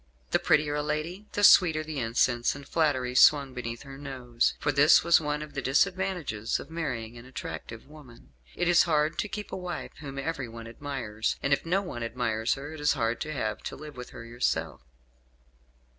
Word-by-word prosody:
The - - +3
prettier 150 -1 +2
a 150 - 0
lady, 155 +7 -3
the 205 - -1
sweeter 160 -6 +7
the 155 -2 -5
incense 120 +1 +1
and 140 -1 -10
flattery 130 -6 +1
swung 140 +1 +5
beneath 120 -1 -5
her 135 -1 -10
nose; 125 -4 -1
for 145 - +1
this 145 +2 +6
was 170 -1 +5
one 150 0 -2
of 150 - -11
the 140 - -3
disadvantages 170 - 0
of - - -10
marrying 120 -8 -4
an 120 - -13
attractive 130 -3 -7
woman. 135 - -16 0.2
"It 175 - 0
is 175 -1 +6
hard 155 0 +1
to - - 0
keep 210 0 -6
a - - -3
wife 180 -1 -5
whom 140 -2 -8
everyone 135 -6 -4
admires; 115 -3 -3
and 140 - +2
if 140 - -1
no 190 +4 +1
one 120 -10 -6
admires 115 -1 -1
her 145 +3 -8
it 160 - -9
is 150 0 +3
hard 115 -3 -1
to 155 - -3
have 110 -7 -3
to - - -6
live 150 0 -10
with 125 0 -8
her 115 - -10
yourself." 120 - -2
140 Hz, 195 wpm, -28 LUFS, 120-155 Hz, 0.2 s, sweeter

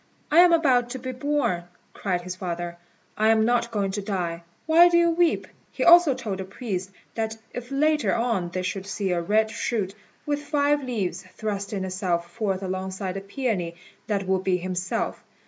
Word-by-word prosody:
"I 320 - +6
am 355 0 +8
about 260 -8 +3
to 260 - -4
be 255 +1 -5
born," 255 -10 -1 0.3
cried 180 -3 -1
his 180 +1 -6
father; 175 -1 -4 0.4
"I 215 - +2
am 220 0 +4
not 235 0 +2
going 205 -4 -1
to 205 +1 -3
die. 180 -4 -3 0.2
Why 335 +2 +7
do 340 - +4
you 340 0 +4
weep?" 335 -1 +2 0.3
He - - -2
also 345 -5 +7
told 215 -7 -4
the - - -2
priests 195 -1 -5 0.2
that 220 -1 -2 0.2
if 245 0 -6
later 300 +2 +2
on 230 -7 0
they 185 +1 -3
should 195 +1 -3
see 195 -1 -2
a 175 -1 +1
red 215 +5 +2
shoot, 210 -4 -2 0.3
with 290 -1 -1
five 290 -1 +1
leaves, 200 -8 -2
thrusting 200 -2 -3
itself 180 -2 -2
forth 200 -4 -1
alongside 190 0 -3
of 195 0 -6
the - - -26
peony, 200 -11 -1 0.3
that 200 -2 -1
would 190 0 +1
be 185 -1 +2
himself. 180 0 -3
205 Hz, 185 wpm, -25 LUFS, 185-255 Hz, 0.4 s, am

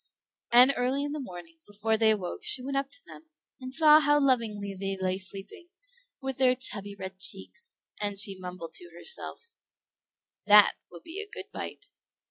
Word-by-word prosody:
And 250 +3 +7
early 260 +3 0
in 290 - -3
the 300 - -4
morning, 175 - -10
before 210 +2 -1
they 220 0 +3
awoke, 205 - -1
she 415 -12 +1
went 275 +1 -4
up 275 0 -1
to - - -12
them, 320 - -13 0.3
and 255 0 -8
saw 305 +2 +6
how 295 -1 +3
lovingly 225 -7 0
they 195 0 -3
lay 185 0 -1
sleeping, 195 - -1 0.5
with 265 -1 -5
their 255 -1 +4
chubby 205 -5 -3
red 190 -1 -8
cheeks; 470 - -6 0.3
and 205 -1 -2
she 195 -2 +2
mumbled 180 -3 -8
to 175 - -10
herself, 465 - -5 0.9
"That 210 0 +8 0.2
will 170 -1 -12
be 360 +5 -7
a 415 - -10
good 470 - -9
bite." - - -7
225 Hz, 175 wpm, -28 LUFS, 195-275 Hz, 0.9 s, That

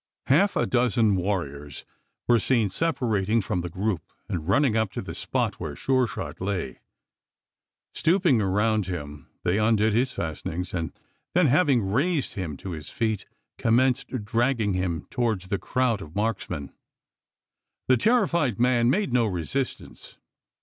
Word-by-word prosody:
Half 190 +9 +3
a - - +2
dozen 120 -4 +2
warriors 75 -7 -3 0.4
were 120 -1 +5
seen 115 -5 +1
separating 115 - +1
from 90 -3 -1
the 90 - -5
group 95 -1 -1 0.3
and 80 -2 -4
running 120 +4 +3
up 110 -3 +1
to - - -3
the - - -6
spot - - -2
where - - -5
Sure 130 -2 +1
shot - - -6
lay. 95 -10 -3 1.1
Stooping 165 - +3
around 105 +1 +1
him, 75 -5 -6 0.2
they 90 +4 +1
undid 110 0 +3
his 125 +4 +2
fastenings; 85 - -4
and 85 -3 -2 0.4
then, 180 -1 +5
having, 140 - +3
raised 140 - 0
him 85 -9 -4
to 95 - -7
his 80 -2 -7
feet, 110 -4 -2 0.3
commenced 125 -1 +1
dragging 115 -2 +1
him 90 -3 -2
towards 110 -7 -1
the 100 -2 0
crowd 125 -5 0
of 80 -2 -10
marksmen. 100 -9 -2 1.1
The 130 - +5
terrified 170 - +2
man 120 -1 +3
made 185 - +1
no 120 -3 +3
resistance. 90 - -4
110 Hz, 145 wpm, -26 LUFS, 90-125 Hz, 1.1 s, were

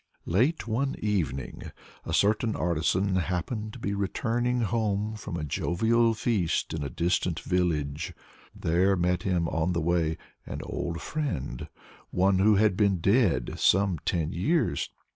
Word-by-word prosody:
Late 115 - +1
one 135 +5 0
evening 90 -11 -2 0.4
a - - -3
certain 110 +2 +2
artisan 90 +4 +1
happened 95 +5 -2
to - - -8
be 100 -4 -3
returning 120 +5 0
home 105 -1 0
from 105 -4 -6
a 80 - -4
jovial 115 - +1
feast 105 -7 0
in 80 - -3
a 70 - -3
distant 85 +3 0
village. 80 -5 -1 0.4
There 90 +4 +2
met 90 0 +1
him 90 -3 0
on 80 +3 0
the 85 - 0
way 80 -1 +1 0.3
an - - -6
old 85 -1 -4
friend, 120 - -3 0.4
one 95 +1 +2
who 105 +2 +5
had 105 -1 +3
been 100 -2 +3
dead 90 - +2
some 95 -3 +3
ten 80 -3 0
years. 125 - 0
95 Hz, 140 wpm, -28 LUFS, 85-110 Hz, 0.4 s, who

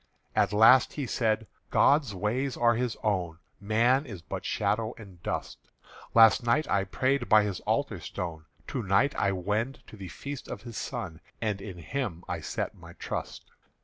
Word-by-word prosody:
At - - +3
last 110 +5 +6
he 145 - -3
said: 110 -2 0 0.2
"God's 140 -8 +3
ways 125 +8 -1
are 120 0 +4
His 120 0 -1
own; 90 -6 0 0.2
Man 120 +7 +2
is 95 -7 -8
but - - -5
shadow 110 0 -1
and 95 -6 -13
dust. - - -4 0.6
Last 115 -1 +7
night 120 +7 +2
I 100 -1 +1
prayed 130 +6 0
by 110 -1 +7
His 100 -3 -3
altar - - 0
stone; 80 -3 -6 0.2
To 130 - -2
night 100 +8 +2
I 100 - +1
wend 105 +8 -2
to - - -13
the 95 -2 -7
Feast 140 +10 -7
of 100 - -7
His 120 -2 -9
Son; 100 -11 -5 0.2
And 105 -3 -2
in 95 -3 -7
Him 90 - -4
I - - -3
set - - -3
my - - -13
trust. - - -5
110 Hz, 175 wpm, -28 LUFS, 100-125 Hz, 0.6 s, Last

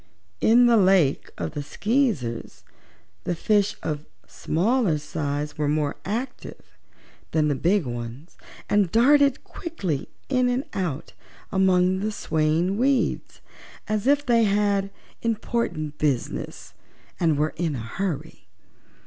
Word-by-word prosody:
In 240 +2 +5
the 235 -1 +5
Lake 185 -8 +3
of - - -3
the 145 -1 -4
Skeezers 200 - -1 0.6
the 175 - -1
fish 205 +3 +2
of 150 -1 -3 0.2
smaller 195 0 +1
size 150 -1 -4
were 150 - +1
more 150 -1 0
active 245 +6 -5 0.6
than 155 -1 +2
the - - +2
big 175 +5 +1
ones 120 +5 -7 0.3
and 205 -4 +2
darted 280 +4 +4
quickly 190 - -4 0.2
in 255 -2 +2
and 250 +2 0
out 165 -6 -3 0.4
among 190 -1 +3
the 215 +2 -1
swaying 160 +1 0
weeds, 265 0 0 0.5
as 215 +2 -1
if 290 +1 +3
they 235 -2 +4
had 200 -1 +1 0.3
important 220 -9 -2
business 140 -5 -2 0.5
and 160 -4 +2
were 155 +1 0
in 160 -3 -1
a 120 - -4
hurry. 155 - -5
185 Hz, 125 wpm, -24 LUFS, 150-225 Hz, 0.6 s, In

